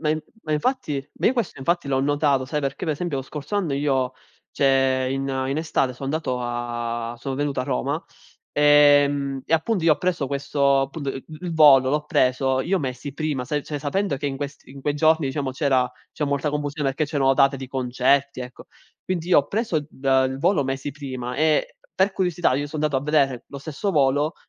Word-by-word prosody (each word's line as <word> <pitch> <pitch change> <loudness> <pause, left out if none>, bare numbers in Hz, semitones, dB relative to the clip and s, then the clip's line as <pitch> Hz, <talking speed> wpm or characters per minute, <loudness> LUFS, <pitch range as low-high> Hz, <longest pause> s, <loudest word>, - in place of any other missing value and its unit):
Ma 150 - 0
in 155 0 0 0.2
ma 155 - -3
infatti 150 - -1
ma, - - -1
io 245 - +5
questo, 235 - -3
infatti, 170 +3 -1
l'ho 135 -1 +1
notato, 145 -1 +1
sai, 150 +3 -2
perché 140 +4 -3
pe 160 - 0
esempio 155 0 -3
lo 135 - -2
scorso 150 +8 -5
anno 180 -8 0
io 135 -3 0 0.4
cioè, 135 -1 +2
in 135 0 -2 0.2
in 135 - -1
estate 155 -5 0
so 130 +2 -9
andato 135 -3 -2
a 120 -1 -3
sono 135 +3 -4
venuto 145 0 -2
a - - -2
Roma, 140 +3 -2 0.5
ehm, 145 -2 +4
e - - -4
appunto, 170 +4 +1
io 165 - +6
ho - - -16
preso 170 -7 -1
questo, 140 -1 +1
punt 150 -4 -6
uhm, 135 -1 -5 0.2
l 180 - -6
l 170 - -3
volo, 140 -5 +6
l'ho 150 +1 0
preso, 130 -1 +2
io 185 +7 0
mesi 130 0 -5
prima, 145 -3 -2
sai, 145 +3 -2
cioè, 150 - -4
sapendo 170 +3 -1
che 145 - -4
in 135 -1 -2
questi 140 -1 -7
in 135 0 -11
quei 145 +1 0
giorni, 160 0 +3
diciamo, 135 0 -2
c'era 130 -3 +1 0.2
c'è 150 - -2
molta 140 +1 -1
confusione, 145 -1 -2
che 155 - 0
c'erano 140 -3 +2
date 135 0 +4
di 135 0 -7
concerti, 130 +2 +1
ecco. 125 0 -9 0.4
Quindi, 175 -3 -3
io 180 - +6
ho 140 - +1
preso 215 -7 0
d 140 -2 -15 0.2
il 130 0 -5
volo 170 +1 +2
mesi 135 +1 -3
prima, 130 -3 -6
e 160 - +1 0.2
per 190 +1 +2
curiosità, 175 -7 +1
io 145 +2 -2
so 155 - -6
andato 150 -1 0
a 130 - -1
vedere 140 -4 +1
lo 140 - -8
stesso 155 +8 -3
volo 145 0 +2
140 Hz, 210 wpm, -23 LUFS, 135-155 Hz, 0.5 s, io